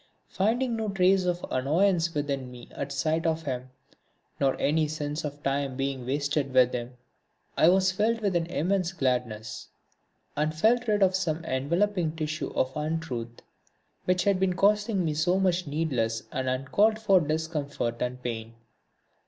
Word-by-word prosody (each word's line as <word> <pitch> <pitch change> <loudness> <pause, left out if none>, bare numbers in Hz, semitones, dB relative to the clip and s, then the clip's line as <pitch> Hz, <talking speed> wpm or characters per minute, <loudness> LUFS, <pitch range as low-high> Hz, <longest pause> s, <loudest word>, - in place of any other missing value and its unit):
Finding 235 +5 0
no 220 -1 -2
trace 190 -1 +3
of 175 0 -1
annoyance 165 +5 +2
within 140 -3 -2
me 125 -1 -11
at 140 - -5
sight 155 +4 0
of 160 0 0
him, 130 -3 -4 0.7
nor 135 -1 +1
any 155 +2 +2
sense 150 0 -4
of 145 -2 -4
my 145 - -26
time 135 -2 -2
being 135 -2 -2
wasted 145 0 0
with 125 -1 +5
him, 125 +1 -5 0.6
I 160 - +5
was 190 +1 +4
filled 220 +4 +1
with 200 -4 0
an 165 -1 +1
immense 180 +2 0
gladness, 125 - -2 0.7
and 155 +1 0
felt 235 +8 +3
rid 210 -2 +3
of 185 -1 +3
some 170 -3 -1
enveloping 165 +5 0
tissue 155 -1 -3
of 130 0 0
untruth 150 -7 -4 0.6
which 180 0 +2
had 200 -2 +2
been 190 -1 +2
causing 205 -1 +2
me 155 - 0
so 175 +5 +2
much 180 -3 +1
needless 130 -7 -1
and 130 0 -2
uncalled 170 +13 +2
for 200 -4 +4
discomfort 150 -6 -2
and 125 0 -3
pain. 115 -1 -5
155 Hz, 160 wpm, -27 LUFS, 135-185 Hz, 0.7 s, with